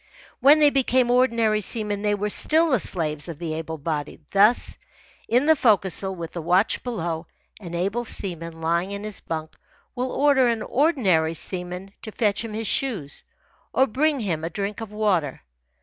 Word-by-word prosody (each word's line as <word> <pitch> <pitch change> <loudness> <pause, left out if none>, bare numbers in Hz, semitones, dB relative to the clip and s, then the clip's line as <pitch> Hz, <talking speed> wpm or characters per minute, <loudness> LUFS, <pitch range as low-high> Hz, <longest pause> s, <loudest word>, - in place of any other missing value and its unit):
When 285 +3 +7
they 295 -1 +5
became 255 -2 +2
ordinary 230 -4 +2
seamen 210 -1 -1
they 210 0 +1
were 205 +1 -2
still 320 +8 +3
the 255 - +3
slaves 155 -3 0
of 165 - -6
the 165 -1 -4
able 160 0 -5
bodied. 150 0 -4
Thus, 210 +4 +3 0.5
in 245 +4 +3
the 315 +1 +5
forecastle, 195 - +2
with 165 -2 -7
the 170 - -4
watch 180 +5 +2
below, 170 -9 -4 0.3
an 175 -4 -7
able 200 +7 -1
seaman, 165 -7 -6
lying 170 +3 0
in 200 0 -6
his 215 -2 -5
bunk, 160 -1 -5 0.4
will 255 +1 -3
order 280 -3 +3
an 230 -2 0
ordinary 205 - +2
seaman 180 +3 -5
to 220 - -8
fetch 210 0 0
him 225 -2 -6
his 225 +1 -3
shoes 205 - -1 0.5
or 265 - +4
bring 285 +4 0
him 165 -7 -2
a 165 - -2
drink 200 +4 -4
of 220 -2 -7
water. 195 -10 0
200 Hz, 175 wpm, -24 LUFS, 170-240 Hz, 0.5 s, When